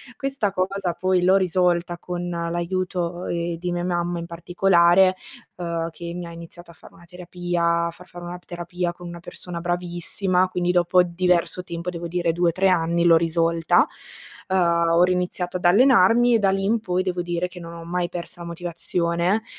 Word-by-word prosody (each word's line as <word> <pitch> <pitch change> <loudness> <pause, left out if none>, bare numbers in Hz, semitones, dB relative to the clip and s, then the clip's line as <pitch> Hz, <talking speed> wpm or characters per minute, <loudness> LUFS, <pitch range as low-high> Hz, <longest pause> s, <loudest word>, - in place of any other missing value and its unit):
Questa 270 -7 -2
cosa 185 -1 -1
poi 185 +1 +1
l'ho 190 +2 +5
risolta 175 -2 +1
con 175 0 -5
l'aiuto, 175 +1 -2
ehm, 170 0 -2
di 175 +1 -4
mia 175 - -2
mamma 175 -1 -1
in 170 - -5
particolare, 175 +2 +3 0.4
uhm, 170 -2 -3
che 170 +1 -7
mi 175 0 -5
ha - - -9
iniziato 170 +1 -11
a - - -16
fare - - -17
una 170 - -18
terapia, 175 -1 -1
a - - -4
far 180 +2 -16
fare 175 -1 -11
una 175 +1 -7
terapia 175 0 -4
con 175 0 -11
una 170 0 -8
persona 175 0 -8
bravissima, 180 +2 0
quindi 180 -1 0
dopo 180 0 +4
diverso 180 0 0
tempo, 170 +1 -5
devo 170 -1 -5
dire 170 0 0
2-3 175 +3 +2
anni 170 -1 +1
l'ho 170 -1 +6
risolta. 165 0 +2 0.6
Uhm, 190 - +1 0.4
ho 170 - +5
riiniziato 180 0 -1
ad 180 - -8
allenarmi 235 +3 +5
e - - +3
da 195 -2 +3
lì 195 0 -1
in 225 +4 +2
poi 185 -3 -1
devo 180 -1 -2
dire 175 +1 -2
che 180 - -11
non 170 -1 -9
ho 170 - -9
mai 175 0 -1
perso 175 0 -8
la 170 - -7
motivazione, 170 +3 -1
175 Hz, 185 wpm, -23 LUFS, 170-180 Hz, 0.6 s, l'ho